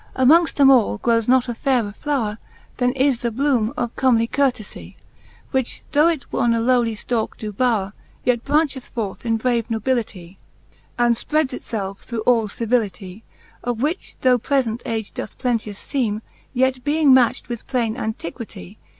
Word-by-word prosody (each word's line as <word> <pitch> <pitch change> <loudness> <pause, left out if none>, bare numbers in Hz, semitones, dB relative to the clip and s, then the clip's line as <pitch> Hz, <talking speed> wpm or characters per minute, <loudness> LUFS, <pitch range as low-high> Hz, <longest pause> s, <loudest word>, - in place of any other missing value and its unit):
IV. - - -2
H - - +5
Amongft 330 +3 +5
them 275 -1 +6
all 225 - +4
growes 230 - +1
not 255 0 +4
a 240 - -2
fayrer 235 -4 0
flowre, 235 -8 -2 0.4
Then 250 0 +2
is 265 -2 +2
the 235 - 0
blooline 245 -2 +1
of 240 -3 -2
comely 235 -3 +3
courtelie, 255 -6 -2 0.6
Which 260 -2 -2
though 300 +3 +5
it 325 -5 -1
on 235 -1 +2
a - - +1
lowly 235 -1 +2
ftalke 225 +1 -2
doe 215 -1 -5
bowre, 210 -3 0 0.3
Yet 245 -2 +1
brancheth 285 -3 0
forth 225 0 -5
in 225 0 +2
brave 235 -1 0
nobilitle, 220 -6 -2 0.6
And 240 -1 +4
fpreds 300 +4 0
itfelfe 195 -6 -5
through 235 -2 -5
all 230 -1 +3
civilitie: 210 -3 -2 0.4
Of 245 0 -2
which 320 +6 -2
though 250 -1 +4
prefent 245 -2 0
age 220 -2 -3
doe - - -4
plenteous 225 -5 -3
feeme, 225 -6 -2 0.3
Yet 260 0 +1
being 295 -1 +3
matcht 250 -3 +3
with 240 -2 -6
plaine 240 -4 0
Antiquitie 210 - -6
240 Hz, 165 wpm, -21 LUFS, 220-260 Hz, 0.6 s, them